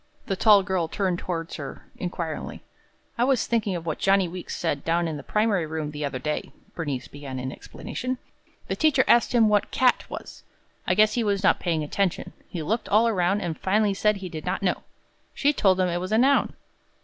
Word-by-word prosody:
The 195 Hz, -, -1 dB
tall 205 Hz, 0 st, +6 dB
girl 185 Hz, -4 st, 0 dB
turned 185 Hz, 0 st, -1 dB
toward 165 Hz, -2 st, -4 dB
her 140 Hz, -3 st, -7 dB
inquiringly. 170 Hz, -3 st, -5 dB, 0.6 s
"I -, -, +4 dB
was 260 Hz, -2 st, +2 dB
thinking 215 Hz, -5 st, 0 dB
of 165 Hz, -1 st, -5 dB
what 160 Hz, -, -3 dB
Johnny 195 Hz, -1 st, +3 dB
Weeks 180 Hz, +1 st, -6 dB
said 145 Hz, -4 st, -1 dB
down 170 Hz, +1 st, +1 dB
in 160 Hz, -, -3 dB
the 145 Hz, -, -6 dB
primary 205 Hz, -1 st, +1 dB
room 155 Hz, -1 st, -3 dB
the 150 Hz, 0 st, -5 dB
other 140 Hz, -2 st, -2 dB
day," 150 Hz, +4 st, -3 dB, 0.2 s
Bernice 145 Hz, -7 st, -4 dB
began 140 Hz, -2 st, -8 dB
in 130 Hz, +1 st, -4 dB
explanation. 255 Hz, -, -5 dB, 0.5 s
"The -, -, -1 dB
teacher 295 Hz, -4 st, +3 dB
asked 240 Hz, -, +5 dB
him 225 Hz, -2 st, +6 dB
what 210 Hz, -1 st, +2 dB
'cat' 255 Hz, -1 st, +2 dB
was. -, -, -8 dB, 0.5 s
I 180 Hz, -, +3 dB
guess 215 Hz, +1 st, +5 dB
he 240 Hz, -, 0 dB
was 200 Hz, -2 st, 0 dB
not -, -, +4 dB
paying 165 Hz, -4 st, 0 dB
attention. 185 Hz, +4 st, -1 dB, 0.2 s
He 170 Hz, -4 st, -4 dB
looked 225 Hz, +8 st, -2 dB
all 215 Hz, +3 st, +4 dB
around, 195 Hz, -2 st, +1 dB
and 170 Hz, -2 st, -2 dB
finally 205 Hz, +3 st, +1 dB
said 210 Hz, +2 st, +2 dB
he 195 Hz, -2 st, -6 dB
did 155 Hz, -2 st, -7 dB
not 185 Hz, +2 st, -2 dB
know. 180 Hz, -, +1 dB, 0.5 s
She 290 Hz, +1 st, +2 dB
told 190 Hz, -8 st, +3 dB
him 185 Hz, -, +3 dB
it 175 Hz, 0 st, -1 dB
was 185 Hz, +3 st, -4 dB
a 220 Hz, -, +4 dB
noun. 270 Hz, +4 st, +3 dB
185 Hz, 210 wpm, -25 LUFS, 165-210 Hz, 0.6 s, tall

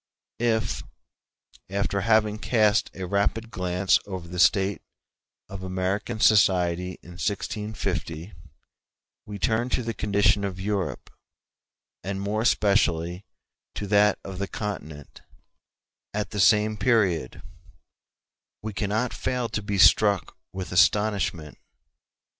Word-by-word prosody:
k 120 Hz, -, 0 dB
[ -, -, +3 dB
Ibid., -, -, +4 dB
p. -, -, +4 dB
90.] 110 Hz, -1 st, -1 dB
If, -, -, -4 dB, 0.9 s
after 100 Hz, 0 st, 0 dB
having 110 Hz, 0 st, +2 dB
cast 110 Hz, -2 st, +2 dB
a 95 Hz, -, -5 dB
rapid 100 Hz, +4 st, -1 dB
glance 90 Hz, 0 st, +1 dB
over 95 Hz, -3 st, -6 dB
the 90 Hz, +1 st, -6 dB
state 95 Hz, +1 st, +3 dB, 0.7 s
of 100 Hz, -1 st, -8 dB
American 95 Hz, +4 st, -2 dB
society 90 Hz, -4 st, +3 dB
in 90 Hz, +1 st, -12 dB
1650, 105 Hz, -5 st, -3 dB, 0.9 s
we 105 Hz, 0 st, -6 dB
turn 110 Hz, +6 st, 0 dB
to 125 Hz, -, -1 dB
the 115 Hz, 0 st, -3 dB
condition 100 Hz, 0 st, +2 dB
of 95 Hz, -1 st, -4 dB
Europe, 100 Hz, -1 st, -3 dB, 0.9 s
and 95 Hz, 0 st, -3 dB
more 105 Hz, +2 st, -1 dB
especially 95 Hz, -5 st, +1 dB, 0.5 s
to 105 Hz, -, -4 dB
that 105 Hz, 0 st, +3 dB
of 95 Hz, -1 st, -7 dB
the 100 Hz, -, -2 dB
Continent, 80 Hz, -10 st, -7 dB, 0.9 s
at 105 Hz, -1 st, -2 dB
the 105 Hz, -, -4 dB
same 105 Hz, +2 st, +4 dB
period, 100 Hz, -, +1 dB, 1.2 s
we 110 Hz, -1 st, -4 dB
cannot 110 Hz, +5 st, -1 dB
fail 125 Hz, -2 st, -2 dB
to 105 Hz, -, -3 dB
be 100 Hz, -1 st, -3 dB
struck 100 Hz, 0 st, +4 dB, 0.2 s
with 95 Hz, -1 st, -6 dB
astonishment. 95 Hz, -4 st, +1 dB
100 Hz, 125 wpm, -25 LUFS, 95-110 Hz, 1.2 s, Ibid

